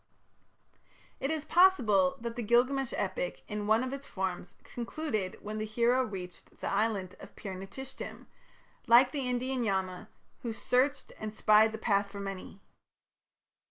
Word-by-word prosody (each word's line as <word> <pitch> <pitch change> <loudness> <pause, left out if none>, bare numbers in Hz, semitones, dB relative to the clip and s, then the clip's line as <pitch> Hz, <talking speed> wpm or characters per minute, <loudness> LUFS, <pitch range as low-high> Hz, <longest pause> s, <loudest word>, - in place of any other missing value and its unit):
It 270 - -1
is 310 -1 -2
possible 230 - +4
that 235 0 -4
the 240 - -3
Gilgamesh 250 +4 +2
epic - - -2
in 210 -1 -3
one 220 +3 +4
of 260 +1 -3
its 275 0 -6
forms 190 -2 -4
concluded 235 - -3
when 215 +1 -5
the 215 - -1
hero 235 +4 +2
reached 185 -6 -8
the - - -3
island 200 -3 0
of - - -12
Pir 195 -3 -6
napishtim, 195 +9 -8 0.6
like 240 +3 +7
the 275 -4 -2
Indian 250 +1 -1
Yama 190 -1 -2 0.3
who 235 -2 -3
"searched 260 +5 +1
and 215 0 -4
spied 215 0 +5
the 220 - -5
path 200 -2 +1
for 200 0 -8
many". 195 0 -7
220 Hz, 150 wpm, -31 LUFS, 200-255 Hz, 0.6 s, like